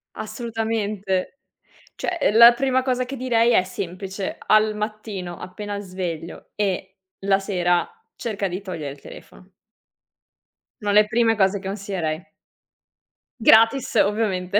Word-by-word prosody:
Assolutamente. 215 -1 -3 0.6
Cioè, 360 - -3
uhm, 220 - +1
la 235 +1 +10
prima 260 0 +1
cosa 255 -1 0
che 270 +2 -6
direi 240 -2 +2
è 185 - +4
semplice, 190 +1 -5
al 215 0 +4
mattino 210 -4 -5
appena 200 +2 -6
sveglio 180 -4 -6
e 190 -1 -2 0.3
la 195 0 +3
sera 175 -3 0 0.3
cerca 205 -4 -3
di 185 +2 -5
togliere 165 -7 -5
il 140 - -13
telefono. 185 +1 -14 1.3
Sono 205 -1 0
le 210 +1 +5
prime 225 0 +2
cose 195 0 +2
consiglierei. 190 -5 -4 1.2
Gratis 230 +5 +5
ovviamente. 205 -2 +1
205 Hz, 120 wpm, -23 LUFS, 185-225 Hz, 1.3 s, la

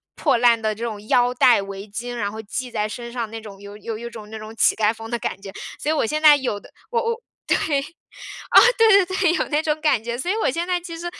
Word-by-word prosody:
破 275 -6 +2
烂 235 -1 +4
的 215 0 0
这 230 - -7
种 215 -3 -5
腰 245 0 +3
带、 245 -4 +5
围 195 +1 -8
巾， 240 +4 -5
然 205 -4 -2
后 220 - -8
系 255 +2 -4
在 210 -1 -1
身 235 +2 -7
上 235 -3 -4
那 225 - -7
种 200 -3 -11
有 200 0 -11
有 215 +1 -6
有 235 +1 -7
一 - - -7
种 215 -2 -10
那 220 - -7
种 215 +1 -9
乞 215 - +3
丐 215 0 +2
风 225 0 -10
的 240 - -1
感 195 - -4
觉。 195 -1 -8 0.3
所 295 - -2
以 315 - +3
我 290 - +1
现 305 +6 -2
在 300 -2 +8
有 255 -6 -2
的 - - -17 0.2
我 470 -1 +1
我， 465 0 -2 0.3
对。 - - +3 0.9
啊， - - +5 0.2
对 410 -5 +6
对 375 +1 -4
对， 350 -3 +3
有 - - 0
那 300 0 +1
种 305 -1 -1
感 270 -8 +2
觉。 235 +1 -3
所 350 +8 -2
以 - - 0
我 - - +3
现 340 +5 -3
在 360 -1 0
其 340 -1 -8
实 345 - -8
235 Hz, 300 characters per minute, -22 LUFS, 215-310 Hz, 0.9 s, 在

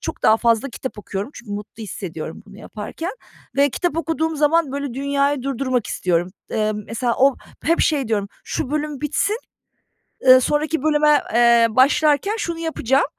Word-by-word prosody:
çok - - -6
daha 220 - +6
fazla 230 +3 +2
kitap 255 -2 -7
okuyorum. 200 +4 -5
Çünkü 235 -4 -9
mutlu 210 +2 -7
hissediyorum 170 -6 -6
bunu 205 0 -14
yaparken 230 - -6 0.4
ve 280 0 +4
kitap 350 +3 -2
okuduğum 320 0 -1
zaman, 300 -1 +2
böyle, 280 -3 -4
dünyayı 280 0 0
durdurmak 255 -3 -1
istiyorum. 175 -1 0 0.2
Eee, 215 -1 0
mesela 230 +3 -2
o 270 +1 +5 0.3
hep 335 +3 +2
şey 280 -6 +1
diyorum: 205 -3 0 0.2
"Şu 270 - -3
bölüm 300 -2 -2
bitsin, 310 +9 0 0.9
ııı, 255 0 +9
sonraki 300 +3 0
bölüme, 300 -1 +4
eee, 235 -1 +6
başlarken 290 - +3
şunu 340 -5 -3
yapacağım." 280 -5 +1
270 Hz, 155 wpm, -21 LUFS, 225-300 Hz, 0.9 s, ııı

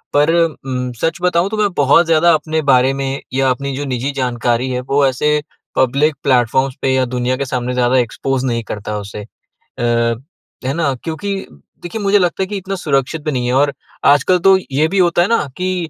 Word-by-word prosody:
पर 150 +3 +4 0.3
म 125 -1 -3
सच 165 -1 0
बताऊँ 180 +1 +2
तो 220 - -4
मैं 210 -1 +2
बहुत 145 +4 +5
ज़्यादा 165 +1 +4
अपने 155 0 0
बारे 130 -2 +4
में, 135 0 -3
या 135 0 +2
अपनी 140 +1 -2
जो 145 +2 -4
निजी 130 +1 -2
जानकारी 120 0 0
है, 125 0 -2
वो 140 +2 +1
ऐसे 150 +3 +1 0.3
पब्लिक 140 +4 +2
प्लेटफ़ॉर्म्स 130 0 +2
पे 130 -1 +1
या 130 -1 +2
दुनिया 125 0 -1
के 140 - -2
सामने 125 -1 -2
ज़्यादा 125 +1 +2
एक्सपोज़ 130 +2 -1
नहीं 115 -2 -1
करता 105 0 -5
उसे। 100 +1 -7 0.4
अ, 120 -1 -1 0.5
है 135 - 0
ना? 155 -4 0
क्योंकि 195 +5 -3 0.5
देखिए, 175 +5 -5
मुझे 200 0 +3
लगता 180 +1 0
है - - -3
कि 205 +1 -4
इतना 195 +1 -4
सुरक्षित 150 -3 -1
भी 155 - -1
नहीं 125 -2 -1
है। 125 - 0
और 140 +2 +2 0.3
आजकल 145 +6 +4
तो 190 0 +7
ये 150 +4 +2
भी 195 - -2
होता 175 -1 +3
है 180 - +2
ना 230 -8 +1
कि 180 -2 -2
140 Hz, 205 wpm, -17 LUFS, 125-165 Hz, 0.5 s, तो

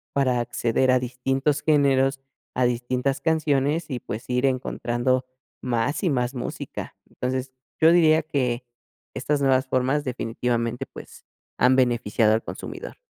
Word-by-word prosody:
para 130 -3 +2
acceder 120 +2 +1
a 130 - +4
distintos 135 +3 -1
géneros, 135 -3 +3 0.4
a 125 - +2
distintas 125 +3 0
canciones, 155 -1 +1
y 125 -4 -3
pues, 110 +3 -7
ir 125 +1 +1
encontrando 130 -1 0 0.4
más 125 - -1
y 180 - +3
más 125 0 -1
música. 125 - -6
Entonces, 130 +1 -3 0.3
yo 160 +1 +7
diría 160 -2 +5
que 130 -5 -1 0.5
estas 145 -1 0
nuevas 130 -1 +3
formas 130 +3 +1
definitivamente, 120 -1 -2
pues, - - -13 0.3
han 125 +1 +4
beneficiado 115 -4 +2
al 110 - 0
consumidor. - - -7
130 Hz, 135 wpm, -24 LUFS, 125-140 Hz, 0.5 s, yo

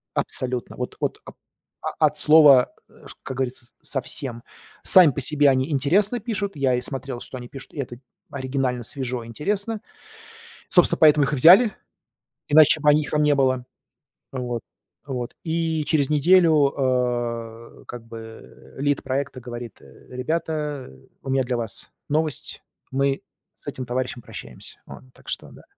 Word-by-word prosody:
Абсолютно. 125 -1 -1
Вот, 125 - -5
от - - -2
о - - -11 0.7
от - - +2
слова, 150 -5 +6 0.2
а, - - -17
ш - - -10
как 130 -1 -6
говорится, 130 -1 -3
с 120 - -15
совсем. 130 -3 -2 0.4
Сами 180 -6 +9
по 140 - -4
себе 145 +1 +4
они 130 +3 +1
интересно 195 - +1
пишут, 200 -4 -3
я 135 -3 +1
и 125 - -2
смотрел, 130 -1 -4
что 130 - -6
они 120 -1 -9
пишут, 135 -1 -11
и - - -14
это 120 -3 -5 0.3
оригинально, 130 -2 -2
свежо, 125 -1 -4
интересно. 200 - -3 0.9
Собственно, - - +4
поэтому 150 -2 +6
их 150 - -3
и - - +1
взяли, 190 - +7 0.8
иначе 155 +1 +6
бы 150 0 +4
они, 150 +1 +3
их 145 - -7
там 150 0 +1
не 150 -1 +3
было. 130 -2 +1 0.7
Вот, 125 -3 -4 0.4
вот. 125 -4 -5
И 160 -1 -1
через 145 -2 +1
неделю, 155 -2 +4 1.1
э, - - -20
как 120 -1 -9
бы 115 -1 -12
лид 145 +1 -1
проекта 135 -1 -3
говорит: 120 -3 -9
"Э, - - -18
ребята, 150 +1 -3 0.3
у 135 - -7
меня 135 0 +1
для 125 -1 -2
вас 115 -4 -4 0.2
новость, 155 -2 -2 0.3
мы 135 +1 0 0.3
с - - -13
этим 130 - -5
товарищем 125 0 -3
прощаемся". 65 - -7
Вот. - - -11
Так - - -22
что - - -5
да, - - -16
135 Hz, 160 wpm, -23 LUFS, 125-150 Hz, 1.1 s, Сами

